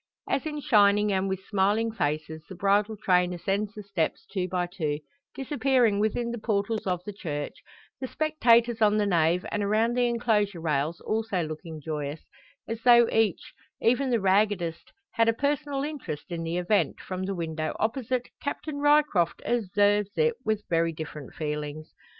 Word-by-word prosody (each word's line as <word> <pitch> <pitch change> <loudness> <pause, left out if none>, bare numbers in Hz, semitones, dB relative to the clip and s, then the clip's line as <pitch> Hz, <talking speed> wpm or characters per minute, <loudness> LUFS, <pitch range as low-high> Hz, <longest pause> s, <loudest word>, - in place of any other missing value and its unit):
As 275 - -1
in 300 -1 -4
shining 210 -4 +4
and 190 0 0
with 190 0 -4
smiling 210 +3 +1
faces, 155 -4 -3
the 190 - -8
bridal 200 +3 +1
train 180 -3 +2
ascends 195 +4 -2
the 210 - -7
steps 195 -5 -2
two 185 -3 -3
by 180 -1 -1
two 160 -5 -2 0.4
disappearing 260 -6 +2
within 235 +3 0
the 235 - -5
portals 210 0 -1
of 180 -1 -1
the 210 - -6
church, 145 -7 -4 0.5
the 260 - -4
spectators 240 -7 +2
on 210 0 +4
the 210 - +2
nave 175 -1 +2
and 210 - -1
around 215 +3 +2
the 245 -1 +3
enclosure 210 -5 +1
rails 155 0 -1
also 215 -5 -1
looking 155 +1 -7
joyous, 150 0 -4 0.5
as 225 0 -4
though 240 -1 +7
each 225 -6 0 0.3
even 250 +4 +2
the 235 -2 +2
raggedest 190 -4 +1 0.2
had 230 0 +3
a - - +3
personal 285 +1 -1
interest 275 - -6
in 170 -1 -3
the 165 +1 -2
event, 180 +4 +1
from 185 0 -5
the 195 0 -3
window 160 -2 -3
opposite, 245 +2 -1
Captain 285 0 -4
Ryecroft 290 - +3
observes 205 -2 +2
it 470 0 +3
with 215 -1 -1
very 165 0 +1
different 155 -3 -8
feelings. 150 0 -5
205 Hz, 165 wpm, -27 LUFS, 170-230 Hz, 0.5 s, though